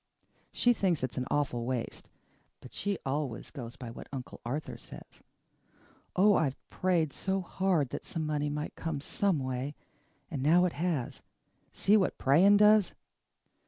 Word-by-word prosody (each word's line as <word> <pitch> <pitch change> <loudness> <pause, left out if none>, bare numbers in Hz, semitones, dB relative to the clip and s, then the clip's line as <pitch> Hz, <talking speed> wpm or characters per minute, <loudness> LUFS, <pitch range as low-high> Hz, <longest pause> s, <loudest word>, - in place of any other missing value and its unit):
She 245 - +3
thinks 180 - 0
it's 130 0 -2
an 130 - -3
awful 135 -5 0
waste, 125 -1 -4 0.5
but 125 - -13
she 200 -2 -2
always 135 -3 -3
goes 120 -5 -7
by 120 -2 -8
what - - -10
Uncle 130 -2 -7
Arthur 140 +6 -4
says. - - -12 0.9
Oh, 205 +3 +6
I've 140 -8 +1
prayed 170 -6 +1
so 190 0 -1
hard 180 -6 0
that - - -5
some 160 -2 -3
money 150 -1 -1
might 150 +1 -4
come 160 -3 -3
some 190 +5 0
way, 130 +1 -3 0.6
and 140 -5 -3
now 170 +6 +5
it 180 - -1
has. 155 -5 -2 0.5
See 210 +2 +3
what 190 - +1
praying 180 +10 +5
does!" 210 -1 +5
150 Hz, 155 wpm, -30 LUFS, 130-185 Hz, 0.9 s, Oh